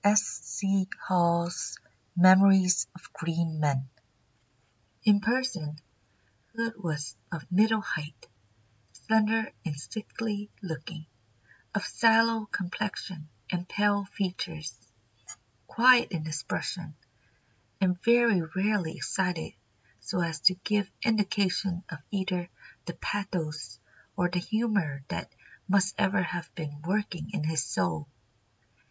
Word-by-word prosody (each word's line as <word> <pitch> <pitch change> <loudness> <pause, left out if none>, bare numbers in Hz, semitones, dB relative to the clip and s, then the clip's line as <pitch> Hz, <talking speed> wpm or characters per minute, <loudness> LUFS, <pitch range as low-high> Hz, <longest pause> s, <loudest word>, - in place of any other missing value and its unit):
[Sidenote: 205 +1 +6
S. 210 - +1
C. 195 -1 0
Hall's 170 -1 +1 0.4
Memories 185 0 +7
of 180 - -15
Great 170 0 -1
Men.] 145 -4 0 1.2
"In 205 -1 +6
person 220 -10 -1 0.8
Hood 230 0 -1
was 150 -7 -3 0.2
of 165 -3 -5
middle 215 +3 +4
height, 155 -4 -5 0.7
slender 220 - +1
and 150 -5 -4
sickly 210 +2 -5
looking, 160 -1 -6 0.7
of 200 - 0
sallow 225 -1 +4
complexion 185 -5 -4 0.2
and 180 0 -3
pale 205 -1 +2
features, 180 -6 -4 0.9
quiet 245 +1 +6
in 165 -4 -3
expression, 155 -1 -4 0.8
and 180 -2 +1
very 235 -5 +5
rarely 190 -4 +1
excited 180 -4 -2 0.5
so 115 +10 -3
as 165 -1 -1
to 185 +4 +6
give 205 -2 +1
indication 195 -4 +1
of 160 - -7
either 185 -3 -2 0.4
the 170 - -3
pathos 170 -8 -3 0.4
or 180 0 +2
the 180 0 0
humour 200 -8 0
that - - -4 0.4
must 195 0 +3
ever 195 -1 +3
have 175 -1 -4
been 145 -3 -6
working 190 -4 -1
in 170 - -1
his 155 -2 +1
soul. 85 - -1
185 Hz, 110 wpm, -29 LUFS, 165-205 Hz, 1.2 s, Memories